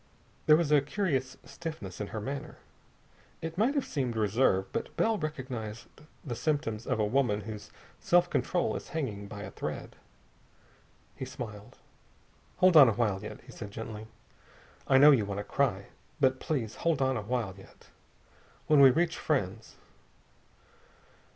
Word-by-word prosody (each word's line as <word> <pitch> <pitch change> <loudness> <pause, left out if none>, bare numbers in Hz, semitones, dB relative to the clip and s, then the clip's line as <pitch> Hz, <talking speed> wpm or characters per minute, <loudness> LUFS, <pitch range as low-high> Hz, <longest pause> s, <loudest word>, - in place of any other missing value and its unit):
There 155 - +8
was 155 -2 +1
a 150 -2 +6
curious 140 -5 -1
stiffness 155 - -7
in 105 - -3
her 110 - -5
manner. 135 +6 -5 0.8
It 165 0 -5
might 230 +10 +2
have 280 - +1
seemed 130 -5 -2
reserve, 105 -2 +2
but - - -4
Bell 225 0 +2
recognized 130 -8 -5 0.4
the 120 -5 -3
symptoms 130 -5 -2
of - - 0
a 105 - +3
woman 110 -2 +1
whose 105 0 -8 0.3
self 175 0 +4
control 175 0 0
is - - -6
hanging 105 -9 -3
by 105 0 -8
a - - -7
thread. - - -6 1.2
He - - -6
smiled. 110 -5 -8 0.8
"Hold 185 -1 +5
on 140 -6 +10
a - - +1
while 105 -4 0
yet," 105 - -8
he 125 - -14
said 110 -5 -8
gently. 110 +1 -7 0.8
"I 135 - +5
know 145 +3 +9
you 125 -7 +4
want 100 -1 -4
to 100 - -3
cry. 105 -4 -1 0.3
But 130 -2 +3
please 125 -9 -3
hold 165 -4 +1
on 130 -1 +2
a 115 - -2
while 110 -2 -2
yet. 95 - -17 0.8
When 150 -2 +5
we 135 -1 +9
reach 165 +6 +1
friends...." 100 - -2
130 Hz, 155 wpm, -30 LUFS, 105-150 Hz, 1.2 s, on